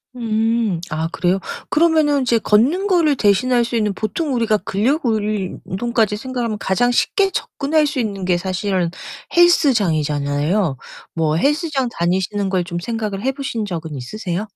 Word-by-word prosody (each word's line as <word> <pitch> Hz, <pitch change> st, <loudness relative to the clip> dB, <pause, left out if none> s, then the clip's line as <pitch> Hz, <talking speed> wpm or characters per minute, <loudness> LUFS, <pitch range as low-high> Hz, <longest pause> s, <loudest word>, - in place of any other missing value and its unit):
음. 225 Hz, -4 st, 0 dB
아 160 Hz, +2 st, -2 dB
그래요? 185 Hz, +2 st, +1 dB, 0.3 s
그러면은 310 Hz, -3 st, +3 dB
이제 240 Hz, -2 st, +2 dB
걷는 270 Hz, -, +2 dB
거를 335 Hz, -7 st, +3 dB
대신할 240 Hz, +4 st, +3 dB
수 235 Hz, -, -4 dB
있는 210 Hz, -3 st, +1 dB
보통 265 Hz, -, -2 dB
우리가 230 Hz, -3 st, +2 dB
근력운동까지 215 Hz, -, -1 dB
생각하면 235 Hz, -1 st, -3 dB
가장 230 Hz, +5 st, +1 dB
쉽게 390 Hz, -, +2 dB
접근할 305 Hz, 0 st, 0 dB
수 285 Hz, -2 st, -2 dB
있는 200 Hz, -4 st, -3 dB
게 180 Hz, -1 st, +2 dB
사실은 185 Hz, -1 st, -1 dB, 0.5 s
헬스장이잖아요. 165 Hz, -, +2 dB, 0.4 s
뭐 160 Hz, -2 st, +1 dB
헬스장 290 Hz, -, 0 dB
다니시는 190 Hz, +3 st, 0 dB
걸 185 Hz, -2 st, 0 dB
좀 175 Hz, -1 st, -4 dB
생각을 215 Hz, 0 st, -3 dB
해보신 265 Hz, -3 st, -2 dB
적은 165 Hz, -5 st, -5 dB
있으세요? 180 Hz, -, -4 dB
215 Hz, 325 characters per minute, -19 LUFS, 185-260 Hz, 0.5 s, 그러면은